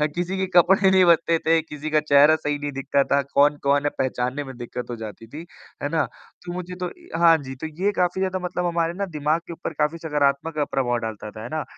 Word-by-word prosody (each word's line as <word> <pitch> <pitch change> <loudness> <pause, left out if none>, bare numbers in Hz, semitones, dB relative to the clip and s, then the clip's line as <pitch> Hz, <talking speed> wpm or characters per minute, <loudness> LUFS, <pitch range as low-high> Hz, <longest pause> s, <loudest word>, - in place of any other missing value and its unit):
किसी 180 +2 -2
के 190 - 0
कपड़े 190 +2 +4
नहीं 190 -1 +5
बचते 165 -1 +4
थे, 165 0 +2
किसी 150 -1 -7
का 155 0 +3
चेहरा 150 +1 +5
सही 150 -1 -2
नहीं 145 0 -4
दिखता 135 +1 0
था, 140 +1 +2
कौन-कौन 145 0 +3
है - - +3
पहचानने 130 +2 -1
में 130 -2 -9
दिक़्क़त 120 0 -6
हो 120 - -3
जाती 110 0 -9
थी, 155 +7 -9 0.4
है 145 - 0
ना? 160 0 +1 0.4
तो 175 - -5
मुझे 180 0 -6
तो - - 0 0.3
हाँ 165 -1 +7
जी, 135 -2 -8
तो 160 +5 -6 0.2
ये 205 - +3
काफ़ी 180 +1 0
ज़्यादा 185 0 -1
मतलब 180 0 -2
हमारे 170 -1 0
ना 200 +2 -3
दिमाग 155 +3 +1
के 170 - -6
ऊपर 165 - -6
काफ़ी 155 +3 +1
सकारात्मक 150 0 0
प्रभाव 125 -3 0
डालता 110 -2 -6
था, 110 - -9
है 120 - -7
ना? 155 -1 -2
150 Hz, 230 wpm, -23 LUFS, 140-170 Hz, 0.4 s, हाँ